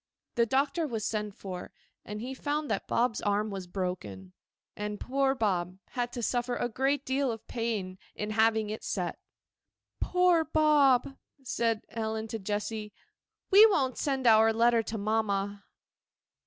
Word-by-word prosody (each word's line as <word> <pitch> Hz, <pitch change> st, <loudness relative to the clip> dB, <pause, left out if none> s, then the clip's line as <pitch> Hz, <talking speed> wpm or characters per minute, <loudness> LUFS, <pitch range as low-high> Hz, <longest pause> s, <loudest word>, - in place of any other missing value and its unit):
The 235 Hz, -1 st, +2 dB
doctor 280 Hz, +6 st, +1 dB
was 225 Hz, -5 st, -3 dB
sent 210 Hz, -2 st, -2 dB
for, 185 Hz, -2 st, -7 dB, 0.3 s
and 210 Hz, +1 st, -6 dB
he 255 Hz, +3 st, -4 dB
found 290 Hz, +2 st, -2 dB
that -, -, -2 dB
Bob's 235 Hz, -2 st, +1 dB
arm 210 Hz, +1 st, 0 dB
was 190 Hz, -2 st, -6 dB
broken; 140 Hz, -, -5 dB, 0.4 s
and 210 Hz, 0 st, -4 dB
poor 270 Hz, +1 st, +1 dB
Bob 185 Hz, -6 st, -1 dB
had 245 Hz, -1 st, -2 dB
to 240 Hz, -, -4 dB
suffer 245 Hz, +1 st, 0 dB
a 240 Hz, -, -1 dB
great 270 Hz, +4 st, 0 dB
deal 265 Hz, 0 st, +1 dB
of 225 Hz, -1 st, -8 dB
pain 210 Hz, -6 st, -3 dB, 0.2 s
in 210 Hz, 0 st, -3 dB
having 220 Hz, -1 st, +2 dB
it 215 Hz, -, -6 dB
set. 180 Hz, -4 st, -3 dB, 0.8 s
'Poor 360 Hz, -2 st, +3 dB
Bob!' 290 Hz, -4 st, +3 dB, 0.3 s
said 230 Hz, -3 st, 0 dB
Ellen 220 Hz, -1 st, -3 dB
to 225 Hz, -, -4 dB
Jessy; 210 Hz, +1 st, -3 dB, 0.6 s
'we 400 Hz, +3 st, +9 dB
won't 270 Hz, -, 0 dB
send 270 Hz, -3 st, -1 dB
our 225 Hz, -1 st, +6 dB
letter 230 Hz, +1 st, +3 dB
to 220 Hz, +1 st, -5 dB
mamma. 205 Hz, -1 st, -1 dB
225 Hz, 150 wpm, -29 LUFS, 210-265 Hz, 0.8 s, we